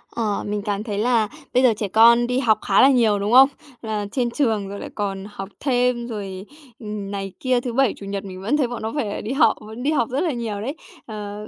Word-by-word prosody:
Ờ, 215 -3 -1
mình 210 0 -2
cảm 205 0 -2
thấy 210 -3 -4
là 225 -1 +2 0.3
bây 255 +1 +3
giờ 245 - +5
trẻ 210 - -2
con 235 +4 +5
đi 250 +1 0
học 225 -5 +3
khá 195 - +4
là 270 - +7
nhiều, 225 -6 +3
đúng 205 +3 -1
không? 265 +2 +8 0.3
Là 215 -2 -3
trên 245 0 0
trường 225 -7 0
rồi 200 0 -6
lại - - -7
còn 195 -2 -3
học 195 -1 -7
thêm 250 -3 +1
rồi, 195 -4 -6 0.3
ừm, 210 -3 -6
này 195 -1 -4
kia, 255 -2 +1
thứ 245 -1 -4
Bảy, 265 -2 +3
Chủ 200 - -9
nhật 200 0 -4
mình 185 -1 -8
vẫn 225 +10 +1
thấy 275 -4 +1
bọn 240 -1 -6
nó 220 +1 -3
phải 220 -9 -2
đi 220 - -5
học, 270 -5 +4
vẫn 220 +3 -9
đi 290 - +1
học 240 -7 +1
rất 265 +4 -1
là 340 - 0
nhiều 225 -5 -4
đấy. 270 +8 -4 0.3
Ờ, 210 -1 -7
220 Hz, 250 wpm, -22 LUFS, 205-245 Hz, 0.3 s, không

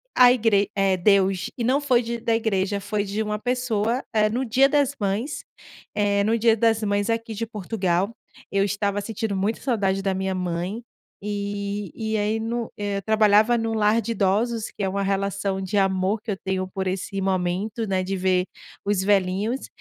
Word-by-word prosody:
a 250 -1 +8
igre 210 -4 +2
é 195 -1 +2
Deus. 190 0 +2
E 235 - -2
não 265 +5 +2
foi 255 -4 +3
de 235 +1 -4
da 230 0 +1
igreja, 200 -3 0
foi 205 +1 -2
de 205 +2 -3
uma 210 0 -2
pessoa, 245 -1 0
eh, 215 -1 +3
no 250 +4 -1
dia 260 +4 +4
das 285 -1 +2
mães. 205 +8 -2 0.5
Eh, 200 -1 +2
no 225 +2 +2
dia 225 0 +4
das 225 0 +2
mães 205 +1 0
aqui 230 0 -1
de 230 +2 -3
Portugal, 200 -1 -1 0.4
eu 195 0 +2
estava 200 0 -1
sentindo 220 -1 -3
muita 200 +4 -1
saudade 195 -7 0
da 195 - +1
minha 190 0 -2
mãe 180 +4 -3 0.4
e 200 -1 -3
e 220 -1 -2
aí 210 +1 0
no 230 +1 -3
eh, 205 -1 -2
eu - - -3
trabalhava 220 +2 +4
no 225 0 -1
lar 215 +1 +3
de 230 +2 -4
idosos, 220 +3 +1
que 205 - -4
é 190 - +1
uma 200 +1 -2
relação 195 0 -1
de 190 +2 -2
amor 195 +2 +1
que 225 - -10
eu - - -1
tenho 190 -1 -2
por 190 0 -4
esse 195 +1 -3
momento, 190 +4 -1
né, 190 -1 0
de 190 +1 -2
ver 185 0 +2 0.4
os 200 -2 +1
velhinhos. 200 +5 +1
205 Hz, 190 wpm, -24 LUFS, 195-225 Hz, 0.5 s, a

